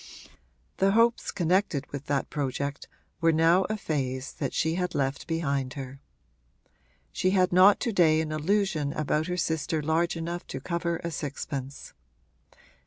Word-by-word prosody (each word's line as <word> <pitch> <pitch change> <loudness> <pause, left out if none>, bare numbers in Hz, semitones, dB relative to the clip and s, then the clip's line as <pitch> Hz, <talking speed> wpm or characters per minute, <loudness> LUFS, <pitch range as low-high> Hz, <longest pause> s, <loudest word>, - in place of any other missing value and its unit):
The 195 +1 +3
hopes 230 +1 +3
connected 180 -4 +1
with 140 0 -6
that 140 -2 -1
project 140 0 -3 0.3
were 165 -1 +4
now 165 +4 +4
a 215 - -2
phase 135 -7 -3
that - - -3
she 160 0 0
had 180 +1 -2
left 135 0 -1
behind 140 -6 -1
her; 135 -1 -7 1.1
she 185 - +1
had 185 -1 +2
not 190 +3 +7
to 235 - -1
day 160 -4 +4
an 160 -1 -2
illusion 155 -2 0
about 155 +1 0
her 180 0 -2
sister 160 -2 -1
large 160 +3 0
enough 170 +1 -5
to 135 - -5
cover 170 +2 -2
a 170 - -3
sixpence. 140 -2 -5
160 Hz, 150 wpm, -27 LUFS, 140-180 Hz, 1.1 s, not